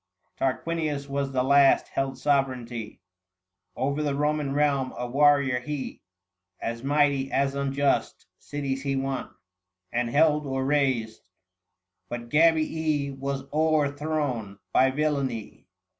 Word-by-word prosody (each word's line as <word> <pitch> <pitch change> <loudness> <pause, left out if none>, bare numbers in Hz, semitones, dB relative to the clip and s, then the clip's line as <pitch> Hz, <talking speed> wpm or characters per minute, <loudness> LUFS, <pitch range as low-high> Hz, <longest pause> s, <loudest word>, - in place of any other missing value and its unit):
Tarquinius 150 +1 -2
was 140 0 -2
the 130 -1 +1
last 140 +1 +5
held 135 -1 -2
sovereignty 125 -5 -1 0.7
Over 140 +4 -1
the 145 -2 0
Roman 150 -1 0
realm: 140 -2 +1
a 125 - -3
warrior 140 -1 +3
lie 140 +2 -5 0.6
735 - - -12
As 115 - -14
mighty 140 -1 +2
as 135 0 +1
unjust: 140 0 0
cities 135 -2 -4
he 140 -1 -1
won, 135 -1 -2 0.6
And 120 0 0
held 150 +2 +3
or 135 0 -1
rased; 130 -8 0 0.8
but 120 -1 -6
Gabii 155 -1 +2
was 135 0 -3
o'erthrown 145 -7 0 0.2
By 130 - +5
villany. 135 -5 -2
140 Hz, 115 wpm, -26 LUFS, 130-145 Hz, 0.8 s, last